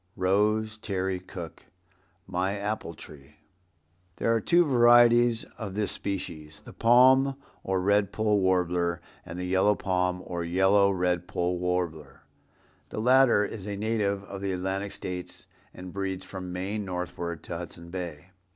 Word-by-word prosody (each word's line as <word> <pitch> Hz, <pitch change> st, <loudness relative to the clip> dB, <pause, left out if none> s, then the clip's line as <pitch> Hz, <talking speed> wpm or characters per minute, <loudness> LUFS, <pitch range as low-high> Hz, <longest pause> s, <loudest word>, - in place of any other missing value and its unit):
—Rose 105 Hz, +3 st, +1 dB
Terry 95 Hz, -3 st, -2 dB
Cooke, 90 Hz, -3 st, -10 dB, 0.6 s
"My 95 Hz, +2 st, -1 dB
Apple 100 Hz, -5 st, -4 dB
Tree." 75 Hz, -1 st, -13 dB, 0.8 s
There 115 Hz, -, +1 dB
are 115 Hz, -, +1 dB
two 175 Hz, +9 st, +4 dB
varieties 120 Hz, -2 st, +5 dB
of 100 Hz, -4 st, -5 dB
this 105 Hz, -1 st, 0 dB
species, 80 Hz, -6 st, -5 dB
the -, -, -13 dB
Palm 130 Hz, +3 st, +5 dB, 0.3 s
or 95 Hz, -1 st, 0 dB
Red 100 Hz, +1 st, +2 dB
poll 105 Hz, -1 st, +1 dB
Warbler, 90 Hz, -2 st, +1 dB, 0.2 s
and 80 Hz, -, -8 dB
the 90 Hz, -, -3 dB
yellow 95 Hz, +3 st, +3 dB
palm 90 Hz, -1 st, -1 dB
or 85 Hz, -1 st, -4 dB
yellow 95 Hz, +3 st, +3 dB
red 90 Hz, -2 st, 0 dB
poll 90 Hz, 0 st, -1 dB
warbler. 90 Hz, -4 st, -3 dB, 0.7 s
The -, -, -5 dB
latter 125 Hz, -2 st, +5 dB
is 100 Hz, -1 st, -7 dB
a 100 Hz, -1 st, -4 dB
native 100 Hz, -2 st, -1 dB
of 100 Hz, -1 st, -8 dB
the 100 Hz, -1 st, -1 dB
Atlantic 95 Hz, +2 st, -3 dB
States 90 Hz, -1 st, -6 dB, 0.3 s
and 90 Hz, -1 st, -10 dB
breeds 95 Hz, -1 st, -3 dB
from 95 Hz, -1 st, -7 dB
Maine 95 Hz, +4 st, -3 dB
northward 90 Hz, -2 st, -5 dB
to 85 Hz, -, -5 dB
Hudson 85 Hz, -1 st, -9 dB
Bay. 90 Hz, -1 st, -6 dB
95 Hz, 145 wpm, -27 LUFS, 90-105 Hz, 0.8 s, varieties